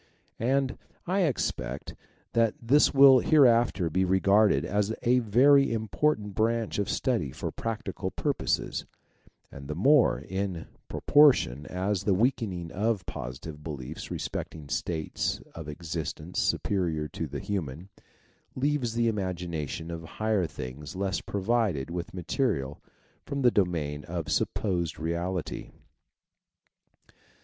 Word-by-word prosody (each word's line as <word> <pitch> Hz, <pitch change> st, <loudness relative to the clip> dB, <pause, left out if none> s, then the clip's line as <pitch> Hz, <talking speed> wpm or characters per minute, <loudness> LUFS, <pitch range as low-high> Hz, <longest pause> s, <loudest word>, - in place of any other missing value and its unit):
And, 130 Hz, +2 st, 0 dB, 0.3 s
I 185 Hz, +3 st, 0 dB
expect, 70 Hz, -, -2 dB, 0.4 s
that 115 Hz, -2 st, +3 dB
this 135 Hz, +4 st, +4 dB
will 135 Hz, -1 st, +8 dB
hereafter 120 Hz, -, +4 dB
be 95 Hz, +4 st, +2 dB
regarded 100 Hz, +3 st, +3 dB
as 105 Hz, +3 st, 0 dB
a 125 Hz, +1 st, +4 dB
very 135 Hz, +5 st, +5 dB
important 110 Hz, 0 st, 0 dB
branch 115 Hz, 0 st, 0 dB
of 100 Hz, -, -1 dB
study 120 Hz, -, 0 dB
for -, -, -5 dB
practical 115 Hz, -1 st, -4 dB
purposes, -, -, -1 dB, 0.7 s
and 70 Hz, 0 st, -10 dB
the 75 Hz, -, -4 dB
more, 135 Hz, -, +4 dB
in 95 Hz, -3 st, -4 dB, 0.2 s
proportion 125 Hz, -, +4 dB
as 95 Hz, +1 st, -1 dB
the 100 Hz, -, +2 dB
weakening 95 Hz, -7 st, 0 dB
of 105 Hz, -2 st, -1 dB
positive 75 Hz, +3 st, -7 dB
beliefs 75 Hz, -1 st, -6 dB
respecting 75 Hz, -3 st, -5 dB
states 80 Hz, 0 st, -2 dB
of 80 Hz, -2 st, -8 dB
ex 80 Hz, +2 st, -8 dB
istence 80 Hz, +1 st, -4 dB
superior 85 Hz, -6 st, 0 dB
to 80 Hz, -, -4 dB
the 70 Hz, 0 st, -5 dB
human, 85 Hz, -1 st, -4 dB, 0.7 s
leaves 130 Hz, -4 st, 0 dB
the 115 Hz, 0 st, +2 dB
imagination 85 Hz, -, -3 dB
of 85 Hz, -1 st, -6 dB
higher 110 Hz, -5 st, +1 dB
things 70 Hz, +1 st, -8 dB
less 95 Hz, 0 st, -1 dB
provided 100 Hz, -, 0 dB
with 85 Hz, -1 st, -4 dB
material 90 Hz, -, -2 dB, 0.5 s
from 140 Hz, -1 st, -2 dB
the 120 Hz, -, +6 dB
domain 80 Hz, -8 st, 0 dB
of 85 Hz, -3 st, -4 dB
supposed 85 Hz, -6 st, 0 dB
reality. 85 Hz, +2 st, -3 dB
95 Hz, 120 wpm, -28 LUFS, 80-115 Hz, 0.7 s, will